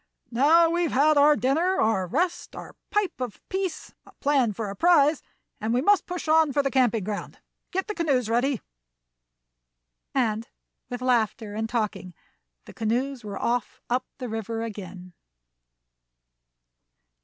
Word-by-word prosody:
"Now 310 +8 +5
we've 345 -2 0
had 300 +4 +4
our 295 +1 +6
dinner, 325 +9 +1
our 205 -4 +1
rest, 340 - -1
our - - -9
pipe 410 -9 -1
of 245 -4 -4
peace, 380 -3 -3
a - - -17
plan 275 -6 +1
for 205 0 -4
a - - -7
prize, 305 - +4 0.4
and 220 +2 -1
we 250 - +2
must 405 +2 +3
push 360 -2 -5
on 315 -1 +4
for 285 +1 +1
the 275 - 0
camping 240 -5 +2
ground. 205 +1 -5 0.3
Get 380 +1 -2
the 425 - -4
canoes 280 - +1
ready." 245 +2 +1 1.5
And, 230 -3 0 0.4
with 250 0 -5
laughter 225 -4 0
and 220 +1 -3
talking, 210 -6 -3 0.5
the - - -12
canoes 245 +3 -1
were 205 -1 -6
off 245 0 -2
up 250 +1 0
the 255 -3 -5
river 225 0 -4
again. 185 -4 -8
255 Hz, 145 wpm, -26 LUFS, 220-310 Hz, 1.5 s, our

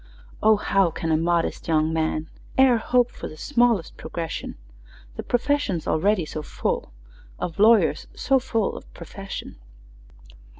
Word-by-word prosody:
"O, 215 0 +6
how 195 -3 +2
can 165 0 -3
a - - +4
modest 170 +1 0
young 160 -1 +2
man 160 -1 -1 0.3
E'er 265 -2 +6
hope 245 +2 +2
for - - -7
the 155 - -11
smallest 240 - +1
progression, 165 -2 -5 0.6
The - - -4
profession's 245 - 0
already 185 +2 +2
so 155 - -5
full 145 - -3 0.5
Of 170 +1 -5
lawyers 220 +1 +4
so 270 -1 +2
full 225 -5 -1
of - - -11
profession!" 195 +3 -8
195 Hz, 135 wpm, -24 LUFS, 160-235 Hz, 0.6 s, O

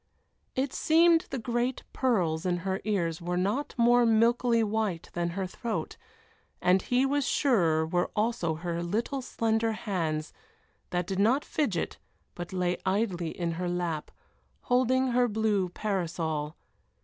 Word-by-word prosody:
It 265 0 -1
seemed 330 +2 +4
the 270 - -3
great 240 +2 -1
pearls 180 -11 +1
in 180 -1 0
her 190 0 -1
ears 175 -6 -1
were 175 +1 -2
not 205 +11 -1
more 240 +1 +5
milkily 230 +1 +3
white 210 -5 -2
than 175 0 -1
her 190 - 0
throat, 225 +5 -4 0.6
and 185 +1 +3
he 250 +6 +2
was 285 +1 +1
sure 170 - +2
were 175 +2 0
also 210 -7 0
her 170 +1 -3
little 225 +10 -2
slender 225 -2 0
hands, 165 -8 -2 0.6
that 175 -1 -1
did 190 +1 -3
not 240 +8 +3
fidget, 220 - -1 0.3
but 175 -1 -7
lay 180 -1 0
idly 190 -4 0
in 170 +1 -3
her 175 +2 -3
lap, 175 -3 -2 0.5
holding 255 +1 +2
her 245 0 +3
blue 210 -4 +1
parasol. 165 -6 -2
200 Hz, 140 wpm, -28 LUFS, 175-240 Hz, 0.6 s, more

